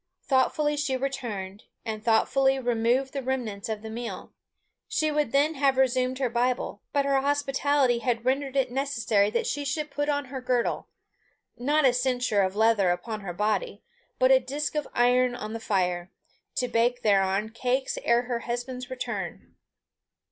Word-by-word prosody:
Thoughtfully 295 +2 +1
she 285 -3 0
returned, 230 -8 -4 0.2
and 215 -1 -4
thoughtfully 265 +4 +3
removed 245 +1 +1
the 275 - -2
remnants 240 -6 -3
of 215 -1 -4
the 220 - -6
meal. 235 +1 -6 0.5
She 310 -8 0
would 295 -5 0
then 290 +3 +3
have 275 -2 +2
resumed 255 0 +2
her 265 -1 0
Bible, 240 -3 -1
but 280 -1 +1
her 275 -1 +2
hospitality 280 -2 +1
had 235 -1 -1
rendered 270 +1 0
it 260 -2 +1
necessary 230 -6 +1
that 235 +2 -1
she 290 - -2
should 290 +1 -3
put 290 +1 -1
on 285 -1 0
her 265 - -4
girdle 250 -1 0 0.7
not 295 +4 +2
a 255 - +5
cincture 245 -4 +1
of 190 0 0
leather 220 -3 +3
upon 215 +5 -2
her 195 -3 -5
body, 215 - -1 0.3
but 255 +1 +4
a 265 - +7
disc 280 +4 -3
of 300 -1 -2
iron 245 +1 +3
on 215 -2 -6
the 225 - -4
fire 180 -4 -1 0.5
to 250 - 0
bake 240 +1 +1
thereon 195 0 +2
cakes 255 +3 -1
ere 235 +1 +3
her 245 -1 -2
husband's 245 +1 -5
return. 255 -1 -5
250 Hz, 165 wpm, -27 LUFS, 225-275 Hz, 0.7 s, a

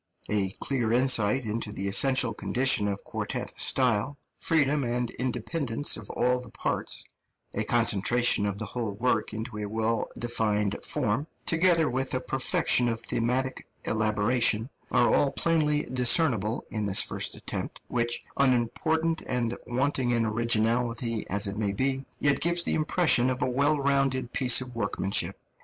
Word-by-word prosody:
A 100 -2 +1
clear 120 -5 -1
insight 125 -1 +3
into 110 0 -3
the 100 -1 -4
essential 130 +2 +3
conditions 120 -2 +1
of 100 0 -4
quartet - - -5
style, 125 +1 +1 0.2
freedom 150 -3 +2
and 120 0 -2
independence 130 +2 -1
of 105 -3 -9
all 125 0 0
the 125 - -11
parts, - - -2 0.5
a - - -1
concentration 115 -1 +2
of 100 -1 -3
the 110 - -3
whole 115 -2 -4
work 115 0 0
into 110 0 -6
a 105 - -4
well 110 +2 -1
defined 105 -4 -1
form, 130 0 -1 0.2
together 165 -1 +3
with 130 +1 -1
a - - 0
perfection 125 -2 +1
of 115 -1 -2
thematic 125 +4 -2 0.2
elaboration, 110 +2 +1 0.2
are 120 -1 +3
all 140 - +3
plainly 150 -3 +1
discernible 125 - +2
in 105 -2 -2
this 95 - +4
first - - -2
attempt, - - -5
which, 120 -1 -2
unimportant 155 +6 +1
and 120 -1 -1
wanting 130 +1 0
in 115 -1 +1
originality 115 +1 0
as 100 +2 +1
it 100 +1 -4
may 105 -2 -1
be, 135 +5 -1 0.2
yet 140 -1 +1
gives 170 +1 +2
the - - -1
impression 155 -5 +3
of 130 0 -2
a 130 - -1
well 145 +4 +2
rounded 135 -3 0
piece 130 -1 +4
of 125 -1 -8
workmanship. 100 -3 0
120 Hz, 150 wpm, -27 LUFS, 110-135 Hz, 0.5 s, this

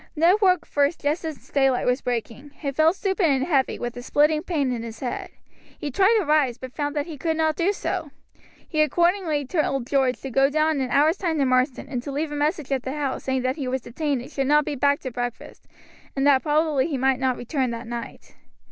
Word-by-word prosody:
Ned 335 +6 +4
woke 365 -3 +3
first 290 +3 0
just 300 +4 -1
as 315 -3 -6
daylight 270 -3 +2
was 250 +2 +1
breaking; 245 +3 -4
he 280 -3 -4
felt 315 +5 +3
stupid 385 -2 0
and 270 -3 +2
heavy, 275 -5 +1
with 240 0 -5
a 245 - -6
splitting 300 +4 +2
pain 295 -7 -1
in 240 -2 -3
his 225 -1 -8
head. 250 - -4 0.5
He 290 - -5
tried 390 - +4
to 410 - 0
rise, 285 -5 +2
but 255 -1 -9
found 290 0 -3
that 290 -1 -1
he 315 -4 -9
could 320 0 -1
not 315 -1 +1
do 355 +4 +2
so. 360 -5 -3 0.6
He 310 -2 +1
accordingly 340 -2 +1
told 275 -4 -1
George 265 -1 +1
to 270 - -6
go 270 +3 +4
down 310 +1 +1
in - - -1
an - - -7
hour's 310 +6 +3
time 335 -5 -1
to 280 - +2
Marsden, 255 +1 +1
and 250 -3 -3
to 280 - -6
leave 295 +2 -2
a - - -4
message 295 -1 -1
at 270 -2 +1
the 260 +2 -4
house 285 -3 -3
saying 265 -1 0
that 255 +3 -1
he 275 -4 -3
was 260 +1 -1
detained 275 +1 -2
and - - -12
should 270 -1 -1
not 295 +1 +4
be - - -2
back 285 +1 +1
to 260 - -5
breakfast, 245 0 -6 0.5
and 270 0 0
that 275 -2 +5
probably 300 -2 +1
he 295 -5 -2
might 265 0 +2
not 260 -2 0
return 255 +1 -1
that 230 0 -5
night. 235 0 -8
285 Hz, 235 wpm, -24 LUFS, 260-310 Hz, 0.6 s, that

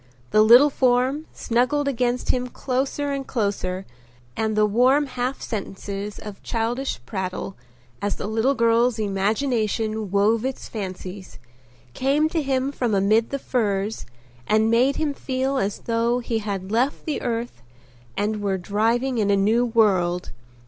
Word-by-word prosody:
The 215 - +5
little 245 +7 +7
form 260 +4 +1
snuggled 255 +5 0
against 250 -2 -1
him 250 0 -2
closer 270 +3 -2
and 275 -1 -3
closer 195 -4 -2 0.5
and 220 -1 -1
the 215 0 +4
warm 255 +7 +3
half 255 0 -3
sentences 200 -1 -5
of 210 -2 -9
childish 240 +3 -2
prattle, 190 -1 -4 0.5
as 205 0 -1
the - - -5
little 225 +6 +1
girl's 235 0 +3
imagination 215 +1 -1
wove 210 +4 +2
its 265 0 -4
fancies, 190 -2 -7 0.6
came 285 +4 +2
to 325 0 0
him 270 -1 0
from 240 -6 -1
amid 215 +4 +3
the 280 - -2
furs 215 -5 -1 0.4
and 220 +1 +3
made 250 +4 +3
him 305 -2 -1
feel 265 0 -2
as 195 -2 -1
though 230 +1 +1
he 235 -2 -2
had 200 -2 -4
left 245 +5 0
the 305 - -2
earth 235 - -3 0.6
and 210 +1 -1
were 195 -2 0
driving 230 +7 0
in 205 -2 +1
a 200 - +4
new 220 +5 +3
world. 185 -6 +2
230 Hz, 145 wpm, -23 LUFS, 205-255 Hz, 0.6 s, little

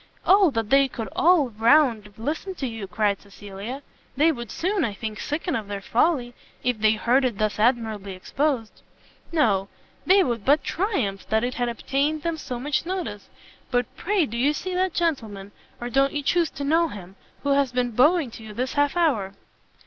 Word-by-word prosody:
"O 385 -1 +6
that 225 -5 -3
they 275 0 +6
could 225 -5 -6
all 330 -6 +4
round 230 -1 +3
listen 315 - -4
to 275 - -4
you!" 225 -5 -5
cried 205 +1 0
Cecilia; 205 +6 -8 0.3
"they 315 +3 +5
would 240 -6 -6
soon, 370 - -1
I 205 - -2
think, 215 0 -5
sicken 320 +4 -2
of 215 -3 -3
their 200 -1 -4
folly, 245 - +1 0.3
if 245 -3 0
they 215 0 +4
heard 240 +5 +2
it 245 -5 0
thus 215 0 -1
admirably 220 -4 0
exposed." 250 +4 -2 0.5
"No; 205 - +2 0.4
they 385 +1 +6
would 235 - -2
but 290 +6 +3
triumph 275 - -2
that 220 +1 +2
it 250 +1 -1
had 245 -1 -1
obtained 285 +6 -1
them 335 -1 -1
so 250 -5 -5
much 285 +3 -1
notice! 340 - -5 0.4
But 245 -2 -1
pray 390 -3 +1
do 235 -3 -6
you 280 +5 +2
see 370 +4 -4
that 370 -1 0
gentleman, 220 - -2 0.3
or 240 - -4
don't 275 +2 +2
you 290 -1 -2
chuse 335 +1 +2
to 285 - -7
know 325 +4 +3
him, 195 - -10 0.3
who 285 - -1
has 275 -2 +2
been 245 -1 0
bowing 285 +4 +3
to 225 - -11
you 215 -1 -10
this 255 +3 -2
half 290 +3 +1
hour?" 220 - +1
250 Hz, 190 wpm, -24 LUFS, 220-305 Hz, 0.5 s, O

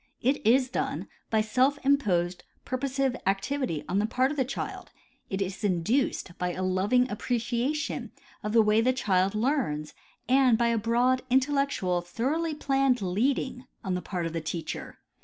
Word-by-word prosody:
It 265 +4 +1
is 250 +4 +4
done - - -3 0.2
hj 220 -1 +3
self 255 +6 +2
imposed 185 -11 +2 0.2
purposive 270 0 -1
activity 195 - -1
on 190 - +1
the 210 - +1
part 255 +4 +1
of 300 - -5
the 265 - +3
child; 265 +2 -5 0.4
it 195 0 0
is 190 +2 -6
induced 190 0 0
by 180 0 -1
a 185 - -3
loving 200 +7 +2
appreciation 240 +4 -1 0.3
of 210 - -3
the 225 0 +5
way 215 +1 +4
the 255 +2 +3
child 195 -5 +1
learns 215 - 0 0.3
and 255 -3 +5
by 235 0 +2
a 230 - +2
broad, 240 +4 +2
intellectual, 265 -9 +1
thoroughly 295 - -1
planned 270 -5 +1
leading 250 +6 0 0.2
on 190 -3 -1
the 180 - -1
part 180 -3 -3
of 165 - -3
the 165 - -2
teacher. 160 0 -5
235 Hz, 160 wpm, -28 LUFS, 190-265 Hz, 0.4 s, the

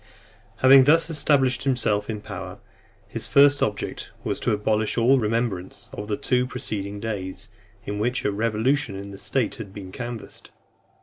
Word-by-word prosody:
XI. - - -27
Having 130 0 +8
thus 165 +3 +4
established 140 -4 +2
himself 120 -6 +1
in 105 -2 -4
power, - - -7 0.5
his - - -5
first 140 0 +5
object 105 - -2
was - - -2
to - - 0
abolish 105 +1 0
all 130 +3 +4
remembrance 110 -5 -2
of 105 - -6
the 105 -1 -1
two 125 0 +1
preceding 100 -4 -4
days, 100 -1 -5 0.4
in 105 0 -4
which 120 +4 -1
a 105 - +2
revolution 110 +2 0
in 100 +1 -7
the 100 - -10
state 130 -5 -1
had 105 -5 -8
been 95 -3 -8
canvassed. 120 0 -7
110 Hz, 165 wpm, -24 LUFS, 105-130 Hz, 0.5 s, Having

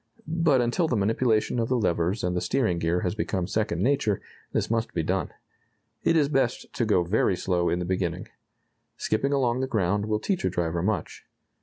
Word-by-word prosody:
But 160 -5 +3
until 120 +8 +1
the 125 - 0
manipulation 110 +3 +1
of 115 - 0
the 130 - +2
levers 90 -1 0
and 90 0 0
the 90 - 0
steering 110 -11 0
gear 85 +2 0
has 90 - -1
become 95 -4 -2
second 100 -3 -1
nature, 125 -7 +1 0.3
this - - -1
must 115 0 -1
be 80 - 0
done. 95 +4 -1 0.7
It - - +2
is 145 -3 +4
best 135 -4 -1
to 120 - 0
go 105 -5 +3
very 95 +1 +2
slow 90 -1 0
in 85 - +1
the 90 - -3
beginning. 90 -2 -2 0.7
Skipping 135 +6 0
along 130 -3 +1
the 130 - -1
ground 105 -2 0
will 105 -1 0
teach 190 - -1
a - - +2
driver 85 -1 -1
much. 95 -2 -2
105 Hz, 195 wpm, -26 LUFS, 90-125 Hz, 0.7 s, is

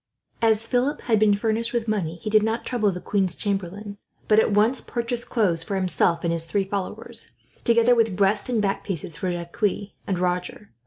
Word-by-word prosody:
As 225 -1 +3
Philip 255 +4 0
had 225 -3 +2
been 210 -1 +4
furnished 225 +3 -1
with 235 -1 -1
money, 190 -7 -1
he 190 +5 -6
did 215 0 +5
not 220 +2 -1
trouble 215 -5 +1
the 180 - -5
queen's 190 -2 0
chamberlain, 200 +1 -4 0.3
but 215 0 +5
at - - +3
once 215 +5 +2
purchased 240 0 -3
clothes 185 -8 +1
for 195 +4 -4
himself 180 -2 +1
and 170 -1 +1
his 165 -1 +2
three 195 +4 0
followers, 195 0 -3 0.3
together 235 +1 +5
with 225 -5 +2
breast 200 +4 +1
and 240 -3 +1
back 195 -1 -1
piece 170 -4 -4
for 185 +5 -3
Jacques 175 +3 -6 0.5
and 190 - 0
Roger. 180 +3 -2
205 Hz, 195 wpm, -24 LUFS, 180-225 Hz, 0.5 s, did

